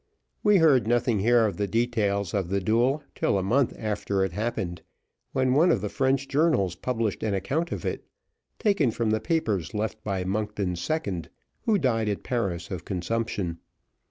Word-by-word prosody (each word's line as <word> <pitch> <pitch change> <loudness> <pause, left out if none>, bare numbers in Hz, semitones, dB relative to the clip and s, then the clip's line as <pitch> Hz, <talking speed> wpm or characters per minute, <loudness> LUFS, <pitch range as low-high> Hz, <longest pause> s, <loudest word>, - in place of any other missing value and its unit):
We 210 -1 +5
heard 145 -9 +4
nothing 120 -2 +2
here 115 +3 +4
of 100 -5 -2
the 100 -1 0
details 100 -4 0
of 95 -4 -1
the 100 +1 +1
duel 120 +9 +1
till - - +1
a 95 - 0
month 125 +6 +2
after 100 -2 -1
it 95 - -4
happened, 90 -4 -3 0.5
when 130 -1 +2
one 160 +6 +5
of 110 - +2
the 105 - -2
French 135 0 +1
journals 140 - +2
published 115 +1 -2
an 105 -2 0
account 150 - -1
of - - -4
it, - - -3 0.5
taken 200 - +2
from 115 -1 -1
the 110 - +2
papers 110 - -1
left 110 +1 -3
by 95 -3 -2
Monkton's 100 -2 -2
second, 100 - -2 0.4
who 220 -3 +4
died 115 - +1
at 100 - -3
Paris 95 -9 -2
of 90 -4 -4
consumption. 95 -2 -2
110 Hz, 175 wpm, -26 LUFS, 95-130 Hz, 0.5 s, We